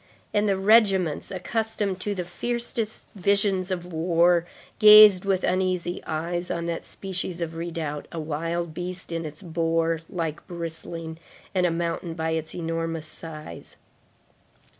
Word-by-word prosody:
and 205 0 +2
the 195 - +2
regiments, 195 -5 +3
accustomed 205 0 -2
to 205 +2 -2
the 180 -2 -3
fiercest 230 +3 -3
visions 200 -1 +1
of 180 -1 -4
war, 170 +1 +3 0.3
gazed 210 -3 +9
with 190 -2 +1
uneasy 185 -1 0
eyes 175 +3 -2
on 170 0 -2
that 170 -1 -3
species 185 -2 -5
of 165 -1 -3
redoubt, 165 -3 -4
a 170 - -5
wild 165 +2 -3
beast 180 +1 -5
in 165 -1 -3
its 155 +2 -8
boar 165 -1 0
like 165 -3 -4
bristling 165 -1 -6 0.3
and 180 -2 +3
a - - 0
mountain 170 0 -2
by 160 0 -1
its 160 -1 -3
enormous 165 -1 -3
size. 155 - -9
175 Hz, 140 wpm, -25 LUFS, 165-190 Hz, 0.3 s, gazed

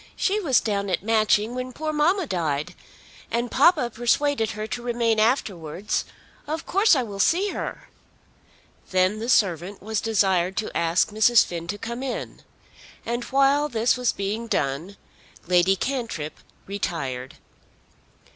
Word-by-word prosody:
She 405 +2 +1
was 285 - +3
down 200 -2 -2
at 180 - -1
Matching 215 0 +2
when 255 0 -5
poor 310 +3 -3
mamma 340 +5 +2
died. 165 - -2 0.6
And 235 +1 -2
papa 290 -4 +4
persuaded 240 +1 +1
her 215 0 -4
to 240 - -5
remain 235 -2 0
afterwards. 200 - 0 0.4
Of 315 +2 -4
course 395 0 +4
I 260 - +1
will 205 -4 -7
see 370 - +3
her." - - -5 1.0
Then 185 +3 +2
the 230 +2 -4
servant 190 -4 +1
was 220 +1 -2
desired 190 -4 +1
to 220 - -3
ask 170 +4 +2
Mrs. 220 +2 +5
Finn 170 -1 -6
to 205 +4 -3
come 235 +4 -5
in; 265 -2 -5 0.6
and 235 +1 -2
while 275 +2 +3
this 230 -1 +2
was 250 -1 +1
being 210 +4 -3
done 155 +3 -2 0.5
Lady 180 +2 +3
Cantrip 230 - -4 0.3
retired. 140 -10 -4
Mrs. - - -33
220 Hz, 145 wpm, -24 LUFS, 185-255 Hz, 1.0 s, Mrs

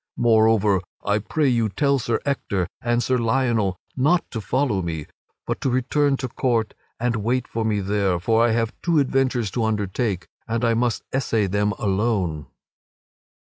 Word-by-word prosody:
Moreover, 110 -4 +4 0.2
I 105 +1 +2
pray 145 +8 0
you 115 -4 +2
tell 140 +5 +1
Sir 115 -1 -1
Ector 100 -10 -1 0.2
and 120 0 +1
Sir 130 -1 +1
Lionel 115 -5 +1 0.2
not 155 +7 +2
to 115 - -4
follow 125 -2 0
after 90 - -3
me, 80 -3 -4 0.4
but - - -3
to - - +1
return 135 +3 +1
to 130 - -3
court 115 -3 0 0.3
and 120 0 0
wait 120 +4 -1
for 115 - -3
me 105 -2 0
there, 100 -2 0
for 110 +5 +2
I 120 - +4
have 115 +1 0
two 170 -2 +1
adventures 130 -6 +1
to 115 - -1
undertake 105 -2 -1 0.2
and 115 +1 0
I 115 - +3
must 120 0 0
essay 115 -5 +1
them 105 +2 0
alone." 95 - -1
115 Hz, 170 wpm, -23 LUFS, 105-125 Hz, 0.4 s, Moreover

